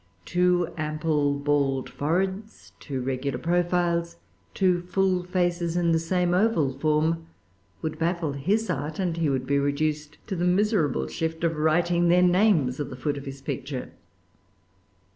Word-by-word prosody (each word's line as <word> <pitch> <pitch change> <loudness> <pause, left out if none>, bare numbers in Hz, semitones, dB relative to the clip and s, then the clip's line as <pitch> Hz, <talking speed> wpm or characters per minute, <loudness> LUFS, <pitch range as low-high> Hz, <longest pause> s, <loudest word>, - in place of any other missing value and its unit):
Two 180 -1 +1
ample 155 -2 0
bald 140 -2 0
foreheads, 190 +7 -3
two 135 -4 -4
regular 130 0 -2
profiles, 170 +1 0 0.4
two 180 -2 +2
full 185 0 0
faces 175 -1 0
of 170 -1 +2
the 165 - +3
same 175 +1 0
oval 180 -9 +2
form, 155 +3 0 0.6
would 155 0 -3
baffle 170 -2 0
his 200 +11 0
art; 150 +2 -3
and 175 -4 -1
he 165 -3 +1
would 130 -2 -1
be 140 +1 +1
reduced 150 +1 -1
to 195 - -4
the 175 - -2
miserable 180 - +2
shift 160 0 -3
of 165 -1 +1
writing 170 +3 +2
their 180 +1 +5
names 180 -8 +3
at 145 -2 -3
the 130 - -7
foot 145 +3 -2
of 140 0 -8
his 135 0 -8
picture. 135 -1 -5
165 Hz, 150 wpm, -26 LUFS, 145-180 Hz, 0.6 s, their